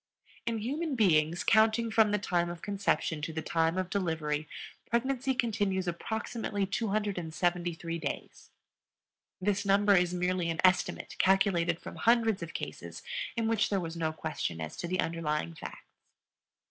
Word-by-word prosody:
In 230 -1 0
human 285 +7 -2
beings, 170 -6 +3
counting 225 +1 +4
from 220 -1 +5
the 210 - +2
time 175 -4 0
of 175 -1 -7
conception 200 -6 0
to 155 - -3
the 160 0 -4
time 165 +1 +1
of 185 0 -2
delivery, 160 -5 -1 0.4
pregnancy 260 +2 0
continues 205 -6 0
approximately 205 +3 -2
273 175 -5 -1
days. - - -6 0.9
This 200 +1 0
number 200 +1 +4
is 180 -1 +3
merely 180 -1 0
an 165 - -2
estimate 185 0 +2
calculated 180 -3 +3
from - - -9
hundreds 225 -4 +3
of 170 0 -7
cases - - -6 0.3
in 230 -2 0
which 225 -2 +2
there 200 - +1
was 165 -2 -5
no 160 -1 -1
question 155 - -3
as 80 -1 -5
to 175 - -4
the 185 +1 -1
underlying 150 - -1
facts. - - -9
185 Hz, 145 wpm, -30 LUFS, 165-215 Hz, 0.9 s, from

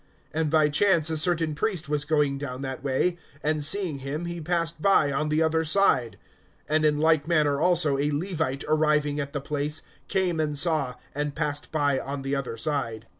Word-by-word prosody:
(31)And 160 0 0
by 155 0 +4
chance 165 0 +2
a - - -1
certain 165 -1 +1
priest 180 0 -2
was 150 0 -1
going 145 -3 +1
down 135 -2 -6
that 130 0 -5
way; 145 +6 0 0.2
and 150 0 0
seeing 165 -2 +2
him, 140 +5 -4
he 170 0 -5
passed 165 0 -2
by 155 -7 +3
on 150 +3 -1
the 155 +1 +2
other 160 0 +1
side. 155 - +2 0.5
(32)And 155 0 +2
in 150 -1 +3
like 160 -1 +2
manner 150 -4 +2
also 165 -5 +3
a 145 +1 +1
Levite, 155 -4 -1
arriving 150 -1 +1
at 140 -1 -4
the 145 - -3
place, 150 +2 -3 0.2
came 185 -4 0
and 150 -2 -1
saw, 145 -6 +2 0.2
and 145 0 -3
passed 150 -2 -3
by 145 -3 +1
on 140 0 -5
the 135 +1 -1
other 130 -4 -4
side. 115 -4 -3
150 Hz, 190 wpm, -26 LUFS, 140-160 Hz, 0.5 s, by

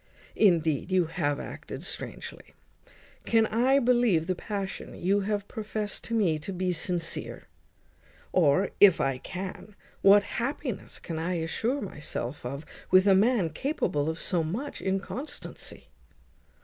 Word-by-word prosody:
Indeed, 165 -6 +3
you 185 -2 +4
have 150 -3 -1
acted - - -7
strangely. - - -7 0.7
Can 225 -1 +3
I 245 +5 +3
believe 240 - +3
the 185 - 0
passion 195 +1 -5
you 195 +3 +1
have 205 0 -2
profest 215 -1 -4
to 230 - -2
me 175 -8 +2
to 155 - -6
be 185 -1 -1
sincere? 170 0 -2 0.8
Or, 180 +2 +3
if 200 -4 +8
I 135 -2 0
can, 190 +5 -7 0.3
what 200 +1 +7
happiness 245 +1 -4
can 160 -2 -5
I 175 +3 -1
assure 225 - -1
myself 150 -7 -5
of 140 +5 -5 0.2
with 185 +1 +6
a 195 - +7
man 200 -3 +3
capable 155 - -1
of 160 +1 -4
so 175 -3 0
much 225 - -4
inconstancy?" 195 +9 -4
190 Hz, 135 wpm, -28 LUFS, 165-215 Hz, 0.8 s, if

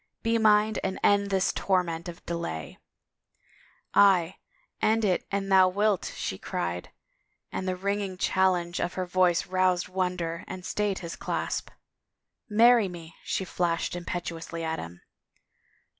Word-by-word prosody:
Be 230 0 +2
mine 215 0 +4
and 190 0 -2
end 200 0 +4
this 190 -1 +1
torment 175 -3 0
of 170 - -11
delay! 170 - -5 0.4
" - - -39
" - - -33
Aye, 190 -3 +4 0.4
end 220 0 +3
it 185 -3 0
an 195 0 -2
thou 190 -1 +6
wilt," 205 0 +1
she - - -4
cried, 85 +1 -3 0.6
and 190 - -3
the 185 - 0
ringing 200 0 -2
challenge 180 -2 +1
of 175 - -2
her 185 - -2
voice 180 -1 +2
roused 185 -1 +1
wonder 180 -2 -2
and 185 -1 -7
stayed 205 -2 -1
his 165 - -5
clasp. - - -3 0.4
" - - -54
Marry 230 0 +6
me! 170 -2 -9
" - - -27
she 190 - 0
flashed 170 -1 -1
imperiously 170 -1 -5
at 160 0 -2
him. 85 +1 -9
185 Hz, 150 wpm, -27 LUFS, 170-200 Hz, 0.6 s, thou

